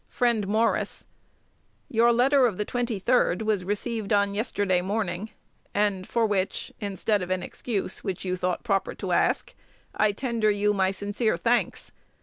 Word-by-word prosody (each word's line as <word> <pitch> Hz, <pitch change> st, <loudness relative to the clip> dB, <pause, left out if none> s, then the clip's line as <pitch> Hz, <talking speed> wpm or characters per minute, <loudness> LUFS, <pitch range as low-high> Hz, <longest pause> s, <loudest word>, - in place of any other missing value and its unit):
Friend 235 Hz, -5 st, +1 dB
Morris, 220 Hz, +3 st, 0 dB, 0.8 s
Your 235 Hz, +1 st, +4 dB
letter 255 Hz, +2 st, +4 dB
of 205 Hz, -6 st, -3 dB
the 210 Hz, -, -1 dB
23d 235 Hz, -4 st, +1 dB
was 215 Hz, -4 st, 0 dB
received 210 Hz, +2 st, -2 dB
on 200 Hz, -1 st, +3 dB
yesterday 205 Hz, -4 st, 0 dB
morning, 200 Hz, 0 st, -2 dB, 0.5 s
and 200 Hz, -3 st, +1 dB
for 235 Hz, -1 st, +2 dB
which 195 Hz, -3 st, -1 dB
(instead 205 Hz, 0 st, 0 dB
of 180 Hz, -, -4 dB
an 185 Hz, 0 st, -1 dB
excuse, 205 Hz, -6 st, -3 dB
which 190 Hz, -2 st, -4 dB
you 185 Hz, 0 st, 0 dB
thought 180 Hz, -1 st, -2 dB
proper 200 Hz, -5 st, 0 dB
to -, -, -4 dB
ask) -, -, +1 dB, 0.4 s
I 215 Hz, -1 st, +3 dB
tender 230 Hz, -1 st, 0 dB
you 210 Hz, 0 st, +2 dB
my 190 Hz, -2 st, +2 dB
sincere 205 Hz, +1 st, -1 dB
thanks. 235 Hz, +8 st, 0 dB
205 Hz, 150 wpm, -26 LUFS, 195-230 Hz, 0.8 s, Your